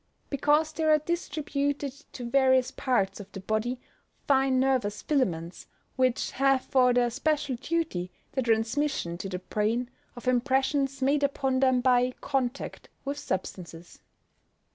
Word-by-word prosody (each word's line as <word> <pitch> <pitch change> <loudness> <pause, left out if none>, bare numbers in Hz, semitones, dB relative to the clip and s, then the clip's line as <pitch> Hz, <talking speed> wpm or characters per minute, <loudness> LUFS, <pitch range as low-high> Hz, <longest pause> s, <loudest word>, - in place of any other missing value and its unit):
_ - - -39
Because 295 +3 +2
there 315 0 0
are 305 - +7
distributed 290 -3 -2 0.2
to 245 -2 -6
various 260 0 +3
parts 230 -8 0
of 205 -1 -10
the 195 - -6
body 220 +5 -2 0.5
fine 265 -2 +3
nervous 255 -6 0
filaments, 175 - -1 0.3
which 255 -2 +1
have 270 -1 +2
for 255 -2 +4
their 245 -1 +2
special 290 +1 0
duty 270 - -2 0.2
the 265 - -1
transmission 225 - 0
to 195 - -4
the 185 - -3
brain 220 +6 -1 0.2
of 240 +1 -10
impressions 265 +2 +1
made 280 +2 +3
upon 270 -2 +1
them 260 -2 +3
by 250 0 +3
contact 270 -1 -3 0.2
with 285 +1 -3
substances. 175 - -5
260 Hz, 140 wpm, -28 LUFS, 235-280 Hz, 0.5 s, are